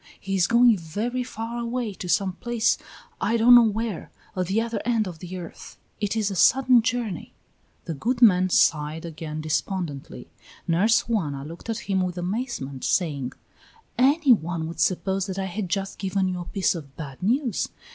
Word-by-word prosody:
He 195 0 -3
is 185 -2 +3
going 235 0 +5
very 215 +10 -3
far 235 -1 -5
away, 235 -2 -2
to 180 0 -7
some 190 0 +1
place, 235 +3 0 0.5
I 230 - +2
don't 235 +2 +7
know 240 - +10
where, 220 -2 -3 0.3
at 185 -2 -1
the 195 +4 +1
other 230 0 -2
end 225 -3 +1
of 170 -3 -8
the 180 +2 -7
earth. 175 -2 -10 0.2
It 205 0 -1
is 215 -2 0
a - - -4
sudden 255 +4 +5
journey." 230 -6 -3 0.5
The 165 - -3
good 235 - -1
man 185 -6 +5
sighed 155 -1 +2
again 155 -1 -6
despondently; 155 -2 -3 0.4
Nurse 195 +7 +3
Juana 150 -12 -2
looked 170 +8 -10
at 225 0 -3
him 190 -1 +1
with 180 -1 -2
amazement, 175 - -4
saying: 140 -8 0 0.6
"Any 275 +2 +5
one 165 -4 -2
would 165 0 -8
suppose 190 +3 0
that 190 -1 -5
I 195 - -1
had 190 0 -4
just 195 +1 -3
given 195 -1 0
you 180 -1 -2
a 175 - -6
piece 195 +1 0
of 145 -6 -9
bad 145 -1 -8
news. 240 +4 0
195 Hz, 180 wpm, -25 LUFS, 170-230 Hz, 0.6 s, know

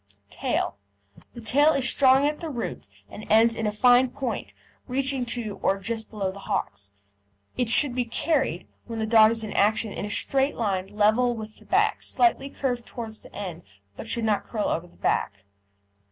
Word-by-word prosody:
TAIL 100 - -2 0.6
The 235 - -8
tail 290 +8 +4
is 270 -2 +1
strong 265 0 +4
at 300 +1 -1
the 330 - -5
root 240 - -5 0.2
and 210 - -10
ends 225 +1 +5
in 225 - -2
a - - 0
fine 245 +4 +4
point, 260 -1 -4 0.4
reaching 265 -1 0
to 225 -4 -3
or 195 - +2
just 220 +3 -4
below 200 -3 -3
the 200 - -11
hocks. 100 - -3 0.6
It 245 -3 0
should 265 +2 +4
be 250 -1 -1
carried, 265 - -1 0.2
when 230 -1 -5
the 220 - -1
dog 220 -1 +6
is 225 0 -1
in 215 - -5
action, 215 +1 +2
in - - -4
a 205 - -4
straight 270 +6 0
line 195 -4 -1
level 220 +4 +2
with 215 -1 -8
the - - -18
back, - - +1
slightly 350 -6 +1
curved 245 -4 -3
towards 220 -2 -7
the - - -16
end, 185 -5 -6 0.3
but - - -8
should 230 0 -1
not 210 -2 0
curl 215 -3 -2
over 165 +2 -2
the 175 - -23
back. 100 -1 -1
230 Hz, 190 wpm, -25 LUFS, 210-255 Hz, 0.6 s, dog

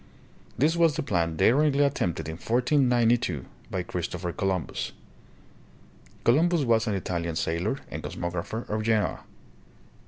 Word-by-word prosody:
This 155 +6 +3
was 165 -3 +3
the - - -2
plan 85 -8 0
daringly 145 - +4
attempted 90 - -1
in 80 0 -5
1492 120 - +2 0.2
by 95 -2 -2
Christopher 90 0 -4
Columbus. 95 -7 -2 1.3
Columbus 160 +6 +3
was 115 -2 +2
an 105 - 0
Italian 85 -3 -2
sailor 85 +11 -1
and - - -5
cosm'ographer 90 +6 -4
of 110 +1 -1
Genoa. 110 -1 +1
110 Hz, 120 wpm, -27 LUFS, 85-130 Hz, 1.3 s, daringly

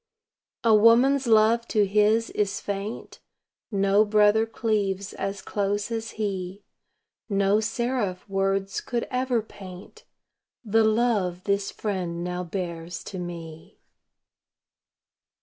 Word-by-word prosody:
A 230 -2 +5
woman's 240 +5 +5
love 225 +1 +4
to 210 -2 +2
His 210 +3 +2
is 200 -1 -1
faint; 200 +2 -5 0.5
No 200 -1 +3
brother 210 +1 +3
cleaves 205 -3 -1
as 195 0 -4
close 205 +2 -2
as 225 0 -3
He; 195 -2 -3 0.7
No 200 +1 +2
seraph 220 -4 -2
words 195 0 -1
could 240 -2 -3
ever 250 -3 0
paint 195 - -12 0.6
The 225 +1 +3
love 215 -5 +1
this 200 -1 0
Friend 180 -5 -3
now 180 0 -3
bears 175 -1 -5
to 190 - -7
me. 165 -2 -8
205 Hz, 110 wpm, -25 LUFS, 195-225 Hz, 0.7 s, A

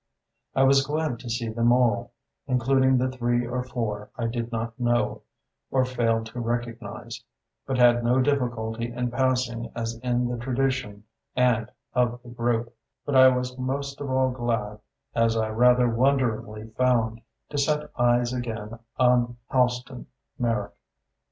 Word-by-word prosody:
I 135 - +4
was 135 +1 +5
glad 150 -3 -2
to 120 - -8
see 115 0 -2
them 115 +1 +2
all, 120 -2 +2 0.4
including 130 +1 +3
the 130 +1 0
three 120 -1 0
or 125 +1 -2
four 115 -5 -4
I 120 - -2
did 115 0 -3
not 115 +1 -4
know, 120 0 +1 0.5
or 130 -1 +2
failed 115 -3 0
to 125 - -5
recognize, 115 0 -4 0.4
but 135 -1 -1
had 120 -1 +5
no 125 +2 +3
difficulty 120 -4 -1
in 125 0 -2
passing 125 -2 0
as 115 0 -3
in 125 -1 0
the 120 0 -3
tradition 125 -4 -1 0.3
and 120 -3 +2 0.2
of 120 -1 +1
the 120 - -12
group; 120 0 -1 0.3
but 145 - -1
I 130 0 +9
was 125 0 +1
most 140 +2 -3
of 140 - -4
all 130 0 +2
glad 115 -4 -2 0.3
as 115 0 +2
I 110 -1 0
rather 125 +2 +4
wonderingly 115 -3 0
found 115 -1 +1 0.3
to 145 - -2
set 150 +1 0
eyes 120 0 +2
again 115 -2 -5 0.2
on 125 -1 +3
Halston 125 0 0 0.3
Merrick. 115 -4 -1
120 Hz, 150 wpm, -25 LUFS, 115-130 Hz, 0.5 s, I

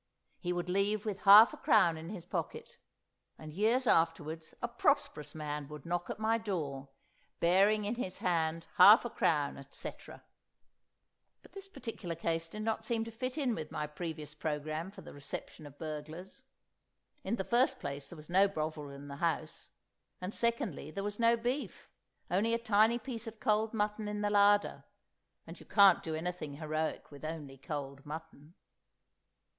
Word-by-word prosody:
He 180 - -2
would 175 0 -2
leave 200 +3 +1
with 205 -2 -3
half 210 +3 +9
a - - -8
crown 165 -1 +4
in 160 +1 -8
his 185 -5 -7
pocket. 170 -3 -5 0.6
And 155 -1 -10
years 225 +8 +2
afterwards 165 -4 +1
a 240 - -2
prosperous 235 - 0
man 150 -2 -4
would 150 -1 -10
knock 175 +1 -2
at - - -4
my 220 +1 +1
door, 145 -10 -4 0.5
bearing 200 +5 +4
in 210 - -1
his 210 -7 -4
hand 165 -2 0
half 215 +4 +9
a 240 - -3
crown, 145 -3 +1
etc. 140 0 -9 1.2
But - - -17
this 390 0 -9
particular 225 - -6
case 165 0 -1
did 215 +6 -7
not 220 0 -1
seem 225 0 0
to 230 - -7
fit 255 +4 -4
in 265 -5 +1
with 155 -6 -5
my 150 - -2
previous 150 -1 -6
programme 155 +2 -3
for 200 - -12
the - - -11
reception 145 +1 -7
of 145 0 -15
burglars. 155 +4 -7 0.8
In - - -1
the 190 - -2
first 255 +4 +2
place 140 0 -5
there 170 - -10
was 150 0 -12
no 190 +3 +4
Bovril 155 -5 -4
in 140 +1 -10
the 140 0 -7
house; 160 -1 -2 0.5
and 185 +3 -5
secondly, 235 - -1
there 195 +5 -5
was 205 +1 -4
no 235 0 +4
beef, 245 +5 -4 0.4
only 220 +6 +2
a - - +1
tiny 225 0 +3
piece 235 -1 -6
of 225 -1 -8
cold 215 -2 +1
mutton 210 -1 -1
in 210 0 -3
the 205 0 0
larder—and 205 0 0
you - - -14
can't 200 -3 +6
do 160 -1 -4
anything 160 -3 -4
heroic 155 +1 -3
with 145 0 -12
only 150 -4 -6
cold 140 -1 -6
mutton. 155 +1 -9
180 Hz, 170 wpm, -32 LUFS, 155-220 Hz, 1.2 s, half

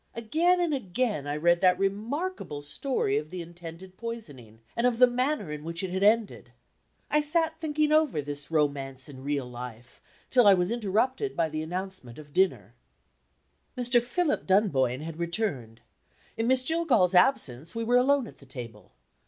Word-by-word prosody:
Again 320 +11 +2
and 345 -3 +1
again, 210 - -2
I 145 +1 -2
read 170 +3 +3
that 180 -1 +5
remarkable 210 - -3
story 145 - -1
of 150 +1 -9
the 180 0 -5
intended 175 +2 -11
poisoning, 145 - -8
and 235 +1 +2
of 240 -2 0
the 250 - +8
manner 250 - -1
in 150 0 -6
which 170 +3 -5
it 185 - -3
had 190 +1 -2
ended. 215 +1 +2 0.6
I 300 - +4
sat 320 +2 0
thinking 305 -1 0
over 305 - +3
this 145 -1 -4
romance 140 -4 -1
in 135 -3 -11
real 140 -2 -1
life 120 -1 -10 0.3
till 245 -5 +5
I 200 - +8
was 180 +2 0
interrupted 240 - 0
by 165 -1 +1
the 155 0 -3
announcement 180 -6 -6
of 150 -2 -13
dinner. 190 0 +1 1.0
Mr. 245 -1 +3
Philip 300 +6 -1
Dunboyne 145 - +2
had 160 +1 -7
returned. 170 - -3 0.5
In 225 0 -1
Miss 260 0 +3
Jillgall's 255 - +2
absence 175 - +2
we 230 - -2
were 245 +2 +3
alone 270 +1 +3
at - - -13
the 140 - -17
table. 125 -3 -10
190 Hz, 170 wpm, -28 LUFS, 150-250 Hz, 1.0 s, the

